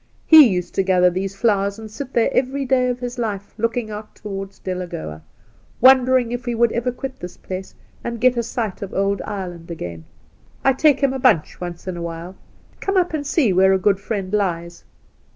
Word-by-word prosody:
He 315 Hz, -4 st, +9 dB
used 180 Hz, -4 st, -2 dB
to -, -, +2 dB
gather 180 Hz, -1 st, +3 dB
these 195 Hz, +2 st, -4 dB
flowe^s}and 205 Hz, 0 st, 0 dB
sit 265 Hz, +4 st, -7 dB
there 230 Hz, -, +2 dB
every 270 Hz, +2 st, 0 dB
day 255 Hz, -1 st, +2 dB
of 245 Hz, 0 st, -2 dB
his 245 Hz, 0 st, -5 dB
•life 205 Hz, -4 st, -4 dB
Japing 230 Hz, 0 st, -1 dB
out 210 Hz, 0 st, -8 dB
towards 195 Hz, -1 st, -7 dB
Delagoa, 170 Hz, -, -5 dB, 0.6 s
wondering 255 Hz, -1 st, +5 dB
if 245 Hz, +1 st, -5 dB
we 240 Hz, -, -1 dB
would 235 Hz, 0 st, +3 dB
ever 240 Hz, +2 st, -1 dB
quit 260 Hz, +1 st, -7 dB
this 180 Hz, 0 st, -8 dB
place 185 Hz, 0 st, -7 dB, 0.3 s
and 235 Hz, -1 st, -4 dB
get 250 Hz, +1 st, +4 dB
a 235 Hz, -, +1 dB
sight 225 Hz, -3 st, -4 dB
of 200 Hz, -, -6 dB
old 195 Hz, 0 st, 0 dB
Ireland 180 Hz, -5 st, -6 dB
again. 85 Hz, -, -7 dB, 0.6 s
I 270 Hz, -, +5 dB
take 290 Hz, +2 st, +3 dB
him 275 Hz, -1 st, +2 dB
a 265 Hz, -, -3 dB
bunch 220 Hz, -, +2 dB
once 175 Hz, 0 st, -7 dB
in 180 Hz, -2 st, -3 dB
a -, -, -5 dB
while. 170 Hz, +2 st, -6 dB, 0.4 s
Come 390 Hz, 0 st, -1 dB
up 355 Hz, -3 st, +2 dB
and 290 Hz, -2 st, -2 dB
see 280 Hz, -, +2 dB
where 190 Hz, +1 st, +5 dB
a -, -, +4 dB
good 195 Hz, +1 st, +2 dB
friend 200 Hz, -2 st, -4 dB
lies." 170 Hz, -4 st, -2 dB
210 Hz, 200 wpm, -21 LUFS, 185-250 Hz, 0.6 s, He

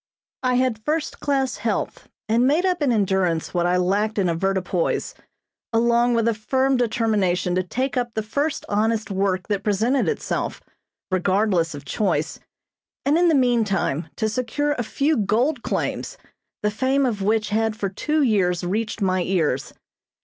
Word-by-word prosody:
I 255 Hz, -1 st, +1 dB
had 245 Hz, -4 st, 0 dB
first 310 Hz, +3 st, -2 dB
class 270 Hz, -5 st, 0 dB
health 210 Hz, 0 st, -3 dB, 0.2 s
and 235 Hz, +3 st, +3 dB
made 315 Hz, +7 st, +2 dB
up 360 Hz, -3 st, 0 dB
in 280 Hz, -4 st, +2 dB
endurance 190 Hz, -6 st, +1 dB
what 175 Hz, -1 st, +1 dB
I 180 Hz, +1 st, +2 dB
lacked 205 Hz, +4 st, 0 dB
in 190 Hz, -3 st, +2 dB
avoirdupois, 185 Hz, 0 st, -1 dB, 0.6 s
along 235 Hz, +1 st, +3 dB
with 230 Hz, 0 st, +2 dB
a 230 Hz, -, +3 dB
firm 260 Hz, +5 st, +1 dB
determination 215 Hz, -7 st, +1 dB
to 185 Hz, -, +2 dB
take 255 Hz, +10 st, -2 dB
up 240 Hz, -2 st, -2 dB
the 220 Hz, -, -1 dB
first 285 Hz, +8 st, -2 dB
honest 215 Hz, +1 st, 0 dB
work 190 Hz, -1 st, 0 dB
that 205 Hz, -2 st, 0 dB
presented 225 Hz, +6 st, +1 dB
itself, 445 Hz, -, -2 dB, 0.5 s
regardless 185 Hz, -3 st, +1 dB
of 140 Hz, 0 st, -9 dB
choice, 160 Hz, -2 st, -1 dB, 0.7 s
and 285 Hz, +2 st, +3 dB
in 345 Hz, +1 st, +4 dB
the 325 Hz, -, +4 dB
meantime 220 Hz, -, +1 dB
to 220 Hz, -, 0 dB
secure 255 Hz, +6 st, -1 dB
a 250 Hz, -5 st, -1 dB
few 285 Hz, +6 st, 0 dB
gold 235 Hz, +7 st, +1 dB
claims, -, -, -3 dB, 0.5 s
the 210 Hz, -, +2 dB
fame 265 Hz, +5 st, +1 dB
of 220 Hz, -5 st, -1 dB
which 215 Hz, +2 st, +1 dB
had 220 Hz, +1 st, 0 dB
for 200 Hz, -, -2 dB
two 300 Hz, +10 st, 0 dB
years 185 Hz, -7 st, +2 dB
reached 215 Hz, +4 st, -2 dB
my 185 Hz, -1 st, +1 dB
ears. 165 Hz, -8 st, 0 dB
220 Hz, 160 wpm, -23 LUFS, 190-255 Hz, 0.7 s, in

